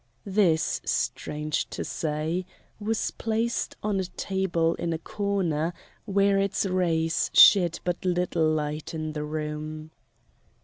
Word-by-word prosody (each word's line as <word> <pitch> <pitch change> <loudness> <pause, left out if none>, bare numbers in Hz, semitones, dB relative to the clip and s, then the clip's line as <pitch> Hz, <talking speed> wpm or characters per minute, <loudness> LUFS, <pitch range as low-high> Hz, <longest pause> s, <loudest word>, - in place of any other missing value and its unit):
This, 190 -5 +2
strange 150 0 -2
to - - -4
say, 155 +3 -2 0.4
was 220 +1 -1
placed 225 +1 -1
on 205 -2 0
a 190 - -1
table 175 -3 0
in 170 -1 -2
a - - -1
corner 175 -3 -1 0.3
where 200 0 +3
its 195 +1 0
rays 170 -3 +1
shed 175 -4 +7
but 175 -1 -2
little 175 -3 +1
light 150 0 -2
in 155 -1 -3
the 150 -1 -3
room. 155 0 -5
170 Hz, 125 wpm, -26 LUFS, 155-195 Hz, 0.4 s, shed